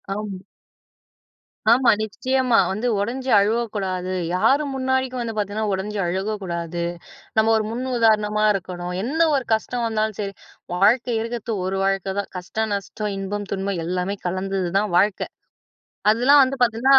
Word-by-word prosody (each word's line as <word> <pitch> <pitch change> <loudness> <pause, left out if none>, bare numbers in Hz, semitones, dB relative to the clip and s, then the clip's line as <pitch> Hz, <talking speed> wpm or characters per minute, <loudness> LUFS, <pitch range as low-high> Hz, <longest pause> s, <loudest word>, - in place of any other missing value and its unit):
ஆம். 205 -3 -5 1.3
ஆமா, 245 +2 +5
நிச்சயமா 255 +2 +1
வந்து 215 +6 -1
உடைஞ்சு 255 +5 -2
அழுவக்கூடாது, 200 -4 -1 0.2
யாரும் 275 +9 +2
முன்னாடிக்கும் 260 -1 0
வந்து 230 -1 -3
பார்த்திங்கன்னா 210 +1 -1
உடஞ்சி 205 +2 -3
அழுகக்கூடாது. 175 -3 -3 0.6
நம்ம 220 +1 +4
ஒரு 220 - +2
முன் 245 +3 -3
உதாரணமா 215 -2 +3
இருக்கணும். 180 -2 -4
என்ன 285 +7 -2 0.2
ஒரு 265 -3 -1
கஷ்டம் 235 +2 -1
வந்தாலும் 220 -1 -1
சரி, 200 -1 -3 0.4
வாழ்க்கை 230 +5 +3
இருக்கிறது 230 -1 -3
ஒரு 190 +1 -1
வாழ்க்கைதான். 195 +1 -1
கஷ்டம், 215 +4 -3
நஷ்டம், 205 +1 -4
இன்பம், 205 +1 -4
துன்பம் 195 -3 -2
எல்லாமே 180 +3 -1
கலந்தது 190 0 -2
தான் 205 -4 -2
வாழ்க்கை. 195 +2 +2 0.9
அதெல்லாம் 275 +5 +6
வந்து 265 +1 -3
பார்த்திங்கன்னா 245 +4 +5
210 Hz, 130 wpm, -22 LUFS, 195-235 Hz, 1.3 s, அதெல்லாம்